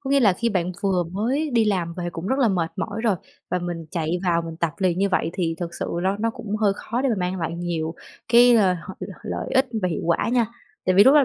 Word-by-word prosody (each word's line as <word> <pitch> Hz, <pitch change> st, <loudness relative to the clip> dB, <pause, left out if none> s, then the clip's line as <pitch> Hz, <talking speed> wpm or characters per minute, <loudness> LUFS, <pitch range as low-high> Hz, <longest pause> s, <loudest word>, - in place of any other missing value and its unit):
có 270 Hz, -2 st, -5 dB
nghĩa 280 Hz, 0 st, +5 dB
là 210 Hz, -6 st, +5 dB
khi 230 Hz, +6 st, 0 dB
bạn 185 Hz, -4 st, 0 dB
vừa 190 Hz, -3 st, +2 dB
mới 260 Hz, +10 st, 0 dB
đi 230 Hz, -2 st, +4 dB
làm 180 Hz, -5 st, 0 dB
về 175 Hz, 0 st, -4 dB
cũng 165 Hz, +1 st, -6 dB
rất 265 Hz, +6 st, +1 dB
là 250 Hz, -5 st, +4 dB
mệt 175 Hz, -4 st, 0 dB
mỏi 220 Hz, 0 st, -3 dB
rồi 220 Hz, -5 st, +2 dB, 0.3 s
và 180 Hz, -, +1 dB
mình 175 Hz, -2 st, -5 dB
chạy 165 Hz, +1 st, -1 dB
vào 170 Hz, -1 st, +2 dB
mình 165 Hz, -1 st, -7 dB
tập 170 Hz, -1 st, 0 dB
liền 185 Hz, -2 st, +1 dB
như 200 Hz, -, +2 dB
vậy 180 Hz, -3 st, +1 dB
thì 170 Hz, -3 st, -1 dB
thực 170 Hz, -1 st, -4 dB
sự -, -, -3 dB, 0.2 s
nó 190 Hz, +2 st, +1 dB
nó 225 Hz, +2 st, 0 dB
cũng 215 Hz, -1 st, -4 dB
hơi 210 Hz, -2 st, +3 dB
khó 240 Hz, +3 st, -3 dB
để 275 Hz, -, +2 dB
mà 235 Hz, -, +2 dB
mang 180 Hz, +1 st, -2 dB
lại 165 Hz, 0 st, -2 dB
nhiều 170 Hz, -2 st, -2 dB, 0.3 s
cái, 240 Hz, +1 st, +7 dB
ờ, 190 Hz, -4 st, +4 dB
h 165 Hz, +1 st, -8 dB, 0.3 s
l -, -, -7 dB
lợi -, -, -3 dB
ích 265 Hz, +1 st, +4 dB, 0.2 s
và 185 Hz, -, +2 dB
hiệu 165 Hz, -, -3 dB
quả 170 Hz, +5 st, +1 dB
nha. 240 Hz, -2 st, +3 dB, 0.4 s
Tại 185 Hz, -, +3 dB
vì 200 Hz, +2 st, +8 dB
lúc 270 Hz, -, +7 dB
đó 295 Hz, -2 st, +7 dB
185 Hz, 280 wpm, -23 LUFS, 170-225 Hz, 0.4 s, vì